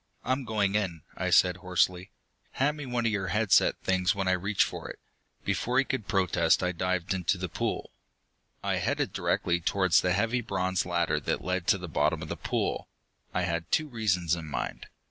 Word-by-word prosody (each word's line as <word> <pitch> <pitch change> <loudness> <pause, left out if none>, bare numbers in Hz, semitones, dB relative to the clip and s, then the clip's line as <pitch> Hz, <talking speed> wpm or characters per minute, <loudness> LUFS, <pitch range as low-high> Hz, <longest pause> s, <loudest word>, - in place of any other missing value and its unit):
"I'm 130 +1 -1
going 105 -3 0
in," 95 -7 -1
I - - -1
said 90 0 +5
hoarsely. 90 0 0 0.4
"Hand 145 +3 +1
me 145 -3 -6
one 120 -1 -1
of 115 - +2
your 100 -3 -1
head 105 +2 0
set - - +5
things 90 -1 +1
when 95 -1 -1
I - - +4
reach 95 +3 +2
for - - -6
it." - - -8 0.5
Before 125 +1 0
he 135 - +4
could 130 -7 -3
protest, 90 -3 +2
I 90 - +1
dived 90 0 -1
into 95 0 0
the 90 0 -3
pool. 80 - -3 0.7
I - - 0
headed - - -1
directly 85 0 0
towards 95 0 +3
the 90 - +1
heavy 115 +5 +1
bronze 95 -4 -1
ladder 85 -1 +1
that - - -2
led 90 -1 -2
to - - +4
the 90 -1 -7
bottom 80 - 0
of - - -7
the - - -2
pool. - - -2 0.4
I 90 - 0
had 85 -1 -2
two 155 - +2
reasons 95 - 0
in 85 -2 -7
mind. 75 - -4
95 Hz, 200 wpm, -28 LUFS, 90-105 Hz, 0.7 s, said